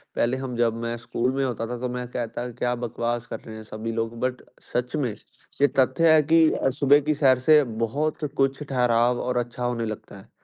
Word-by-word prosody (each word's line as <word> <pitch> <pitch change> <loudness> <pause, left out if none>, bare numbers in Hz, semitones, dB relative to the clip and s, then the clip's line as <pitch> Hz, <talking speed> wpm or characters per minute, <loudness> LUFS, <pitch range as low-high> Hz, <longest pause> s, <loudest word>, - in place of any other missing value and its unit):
पहले 120 +2 +1
हम 130 -2 -5
जब 115 -2 +2
मैं 115 0 -2
स्कूल 120 +2 -1
में 135 - 0
होता 115 -3 -3
था 125 +1 -4
तो 125 0 -2
मैं 125 0 -4
कहता 120 0 -4
क्या 125 +1 -1
बकवास 120 0 -3
कर 115 - -6
रहे 110 - -10
हैं 110 - -9
सभी 110 +1 -5
लोग, 115 0 -3
बट 125 0 -2 0.3
सच 125 +4 -1
में, 130 -8 -1 0.5
ये 145 - +7
तथ्य 160 +5 +4
है 155 - +6
कि 160 +1 +5
अ, - - +1
सुबह 140 +1 +4
की 155 - +4
सैर 135 -3 +4
से 150 -1 +8 0.2
बहुत 150 +6 -2
कुछ 135 +1 +1
ठहराव 125 -3 +2
और 125 0 -1
अच्छा 120 0 -3
होने 120 -1 -1
लगता 110 -2 -7
है। 95 - -15
125 Hz, 220 wpm, -25 LUFS, 115-135 Hz, 0.5 s, से